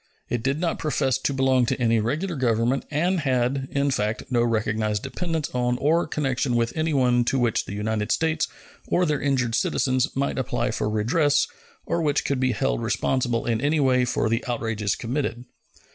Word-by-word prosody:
It 120 - -1
did 135 +5 0
not 170 -1 -1
profess 135 -4 0
to 135 - -1
belong 130 -2 +2
to - - -1
any 115 -2 +3
regular 155 - -1
government, 120 0 +1
and 175 +5 +1
had, 130 -1 0
in 140 0 0
fact, 105 -2 -1
no 120 -1 +3
recognized 110 -2 0
dependence 160 +3 -3
on 125 0 0
or 160 +6 +2
connection 135 -4 -1
with 120 0 0
anyone 135 -6 +2
to 135 - +1
which 120 -4 +1
the 100 - -6
United 105 0 -1
States 160 -1 +1 0.4
or 180 - +2
their 150 -3 0
injured 130 -5 0
citizens 130 +3 +1
might 140 0 -1
apply 120 -1 -1
for 105 - -1
redress 125 +8 +2 0.4
or 170 - -1
which 150 -2 +1
could 140 -2 0
be 130 -1 +1
held - - -1
responsible 120 -3 0
in 115 -1 0
any 150 +3 +1
way 130 -2 +3
for 120 - 0
the 115 +3 0
outrages 110 -4 -1
committed. 125 0 -3
130 Hz, 180 wpm, -24 LUFS, 115-145 Hz, 0.4 s, any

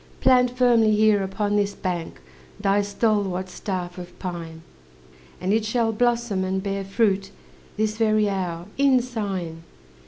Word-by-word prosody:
Plant 250 -1 +5
firmly 230 -4 +4
here 215 -1 +4
upon 205 +2 -1
this 205 -1 0
bank 175 - -4 0.4
Thy 200 +1 +2
stalwart 200 -3 0
staff 180 -2 -5
of 175 0 -10
pine, 165 -3 -6 0.8
And 185 +2 0
it 220 0 +2
shall 225 +1 +1
blossom 235 -3 +1
and 190 0 -2
bear 195 -1 -2
fruit, 195 -1 +1 0.5
This 215 0 0
very 215 -2 +3
hour, 180 -4 -3
in 275 -2 +5
sign." 195 -9 -4
205 Hz, 135 wpm, -24 LUFS, 185-220 Hz, 0.8 s, Plant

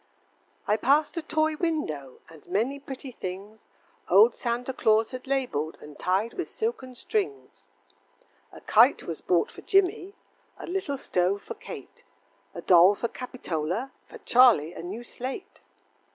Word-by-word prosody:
I 210 - +3
passed 285 +9 +2
a - - 0
toy 315 0 0
window, 155 - -3
And 160 -3 -16
many 255 +8 -1
pretty 270 -1 -8
things 200 +1 -8 0.4
Old 450 +2 +7
Santa 245 +2 -3
Claus 220 -2 +2
had 255 +1 -8
labeled, 245 - -1
And 150 -1 -13
tied 195 +6 0
with 365 - -4
silken 440 - -4
strings. 415 - -4 0.8
A - - -13
kite - - +4
was - - -6
bought 470 - +1
for - - -12
Jimmie, 390 0 +1 0.4
A - - -8
little 345 -6 -3
stove 185 -3 0
for - - -6
Kate, 440 - -11 0.5
A - - -7
doll 180 +2 +6
for 235 - -3
Capitola, 225 - -4 0.2
For 465 - -11
Charlie 240 - +4
a - - -8
new 195 +8 -6
slate. 260 - -7
250 Hz, 145 wpm, -27 LUFS, 195-315 Hz, 0.8 s, Old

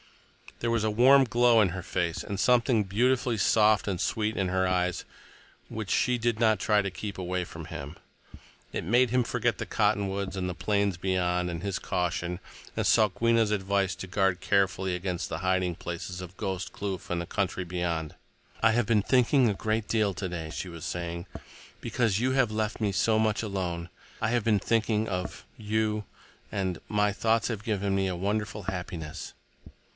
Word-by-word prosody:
There 115 - 0
was 115 -2 +1
a 110 - +1
warm 130 +5 +6
glow 120 -1 +4
in 100 - +3
her 95 +2 -5
face, 85 -2 -2
and 100 -1 -4
something 120 -1 +3
beautifully 120 +4 +1
soft 105 +1 +4
and 95 -3 -1
sweet 110 0 0
in 95 - 0
her 95 0 +1
eyes 90 -1 0 0.6
which 110 -3 -5
she 125 -1 +2
did 115 -1 0
not 110 -3 +3
try 105 -1 +2
to 100 - -3
keep 100 +2 -6
away 90 0 -1
from 80 -1 -9
him. 75 -1 -7 0.8
It - - -3
made 120 +8 +3
him 125 0 +3
forget - - 0
the - - -4
cottonwoods 100 -1 0
and 95 -1 -2
the 90 - -4
plains 100 -2 0
beyond, 90 -1 0
and 85 -2 -4
his 100 -2 -1
caution, 90 0 -2 0.4
and - - -1
Sokwenna's 115 +1 +3
advice 100 -2 0
to 95 - -7
guard 95 -1 +1
carefully 95 -1 +1
against 90 -1 -3
the 80 - -3
hiding 95 -1 +1
places 85 +1 -6
of 90 +1 -10
Ghost 95 -1 -3
Kloof 100 -2 -5
and 90 - -1
the - - -4
country 95 -2 -1
beyond. 85 -3 -3 0.5
"I 115 - +5
have 120 0 +2
been 105 -2 +2
thinking 125 +1 +4
a - - +1
great 110 +2 -1
deal 105 -3 +1
today," 90 -5 -5
she 90 - -5
was 85 -2 -8
saying, 85 0 -4 0.5
"because 115 -5 0
you 130 +2 +1
have 130 -4 +2
left 110 +1 -2
me 105 -2 +1
so 110 +3 +2
much 110 -1 +1
alone. 90 -5 -3 0.3
I 110 - 0
have 120 -1 +1
been 105 -2 +3
thinking 110 +1 +1
of 90 -2 -4
you. 110 0 -1 0.5
And—my 100 +2 0
thoughts 115 +2 +1
have 110 -3 -4
given 100 -3 0
me 95 0 +1
a 90 - -2
wonderful 105 +3 -2
happiness." 90 -4 -5
100 Hz, 180 wpm, -28 LUFS, 90-110 Hz, 0.8 s, warm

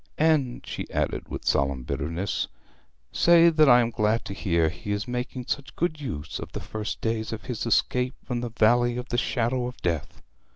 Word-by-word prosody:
'And,' 150 -6 +2
she - - -5
added, - - -2
with - - -6
solemn 70 -2 +1
bitterness, 85 +10 -2 0.6
'say 170 0 +6
that 155 -3 +5
I 125 -1 +8
am 115 0 0
glad 110 +1 +1
to 100 - -5
hear 85 -5 +1
he 105 +5 -6
is 105 +2 -2
making 125 0 -4
such 140 +2 -4
good 155 -3 -1
use 80 - -5
of 80 +1 -7
the - - -3
first 110 +1 -5
days 110 -1 -1
of 110 - -5
his 120 -2 -4
escape 125 +3 +1
from 120 -1 -2
the 120 - -3
Valley 120 +1 +3
of 125 +1 -5
the 120 - -1
Shadow 120 +1 0
of 125 - -8
Death!' 85 -4 -2
120 Hz, 195 wpm, -26 LUFS, 105-125 Hz, 0.6 s, I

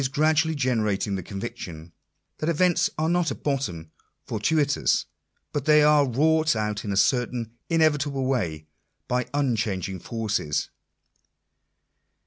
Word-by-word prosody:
4 - - 0
1 130 - -2
gradually 155 +2 +2
generating 110 -7 0
the 95 - -2
conviction, 85 -5 -7 0.5
that 155 - -1
events 175 +2 +2
are 155 +1 0
not 175 -1 +1
at - - -7
bottom 90 - -2 0.3
fortuitous; 145 +6 +1 0.5
but 145 -2 -2
that 155 - +4
they 150 0 +6
are 150 -2 +5
wrought 155 +3 +2
out 105 -1 -2
in 105 - -3
a 100 - -1
certain 120 0 +1 0.2
inevitable 150 -4 +2
way 85 - -1 0.4
by 125 0 0
uncbangingforQes. 110 - -2
125 Hz, 125 wpm, -25 LUFS, 105-150 Hz, 0.5 s, they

